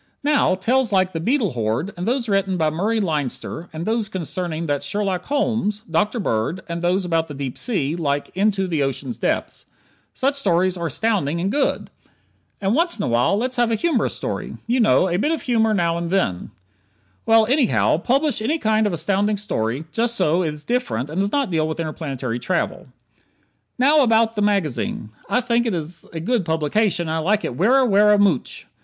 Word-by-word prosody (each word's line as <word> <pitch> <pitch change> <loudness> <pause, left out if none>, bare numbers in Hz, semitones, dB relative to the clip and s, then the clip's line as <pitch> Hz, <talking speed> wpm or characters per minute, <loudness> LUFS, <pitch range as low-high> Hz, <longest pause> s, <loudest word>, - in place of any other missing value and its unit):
Now, 290 -9 +3
tales 245 +5 +1
like 185 -1 +2
"The 165 - -2
Beetle 225 - +1
Horde," 120 - -2
and 180 +3 -4
those 245 0 0
written 195 -2 +1
by 155 -2 +1
Murray 210 +8 0
Leinster, 160 - -3
and 160 +2 -5
those 220 -2 0
concerning 170 -2 -3
that 145 -3 -1
Sherlock 195 -3 -2
Holmes, 225 -7 0
Dr. 210 +8 0
Bird, 160 - -1
and 170 0 -4
those 180 +2 +1
about 165 -2 0
the 145 - -8
deep 135 -2 -4
sea, 165 - -1
like 145 -4 -2
"Into 195 0 +1
the 165 -5 -1
Ocean's 135 - -3
Depths," - - -2 0.5
such 275 +1 +1
stories 185 -8 +1
are 170 -2 -3
astounding, 170 - 0
and 190 +3 -1
good. 285 +2 -1 0.7
And 195 +1 0
once 340 +5 +1
in - - -3
a - - -1
while 120 +11 +2
let's 250 +3 -2
have 240 -1 +3
a 225 - +1
humorous 290 +1 0
story. - - -4
You 245 +2 +1
know: 220 -4 +4
"A 175 -1 0
bit 295 - +1
of 325 - -2
humor 225 -3 +2
now 170 -4 +1
and 170 -1 -3
then 175 - -1 0.4
" 100 -2 -40
Well, 225 -1 +6
anyhow, 255 - +2
publish 270 - +1
any 295 +9 0
kind 215 -5 +2
of 200 - -2
astounding 200 +5 0
story, 135 - -2
just 235 +7 0
so 180 -3 +2
it 160 -4 -1
is 150 0 -10
different 195 - -1
and 175 +5 -1
does 200 +1 -1
not 280 -8 0
deal 160 -2 +1
with 160 +1 -4
interplanetary 135 -7 -4
travel. 175 +5 -2 0.9
Now, 290 +4 +5
about 225 -2 +3
the 210 - -1
magazine. 160 - 0 0.2
I 245 - +2
think 240 -1 +1
it 215 - 0
is 165 +1 -6
a 165 - -5
good 230 +5 0
publication 170 +3 0
and 160 - -2
I 160 - 0
like 200 +6 +1
it 120 - -4
werra, 250 - +4
werra 210 0 +5
mooch. 195 -10 +1
190 Hz, 200 wpm, -21 LUFS, 160-225 Hz, 0.9 s, Well